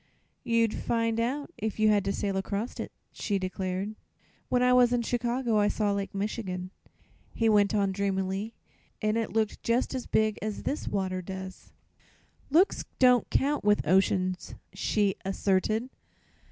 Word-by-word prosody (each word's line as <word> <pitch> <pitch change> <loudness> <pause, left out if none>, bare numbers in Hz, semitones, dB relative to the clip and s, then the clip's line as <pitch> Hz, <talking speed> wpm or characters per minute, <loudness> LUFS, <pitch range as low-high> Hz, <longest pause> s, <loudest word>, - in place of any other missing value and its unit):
"You'd 230 -2 +2
find 230 -1 0
out, 275 +7 -2
if 220 -1 -3
you 215 0 +4
had 205 -2 +3
to 195 - +1
sail 200 -1 -2
across 200 +4 -3
it," - - -4 0.2
she 200 - -2
declared. 185 +1 -3 0.6
"When 250 0 +2
I 250 0 +5
was 250 -1 +5
in 245 -1 +1
Chicago 240 -1 0
I 205 - +3
saw 210 -1 +1
Lake 200 0 -3
Michigan," 190 -3 -3 0.6
he 225 - +2
went 210 -1 +4
on 200 -2 +2
dreamily, 195 +2 -2 0.4
"and 215 0 0
it 230 -1 -1
looked 220 -1 -1
just 235 +4 0
as 255 -2 -4
big 215 -1 +1
as 215 -1 -4
this 290 - -3
water 185 -2 -1
does." 190 0 -8 0.8
"Looks 340 +8 +3
don't 250 -2 +5
count, 285 +2 +1
with 205 -4 +2
oceans," 185 0 +1 0.2
she 200 0 +1
asserted. 195 +4 0
210 Hz, 155 wpm, -28 LUFS, 195-230 Hz, 0.8 s, I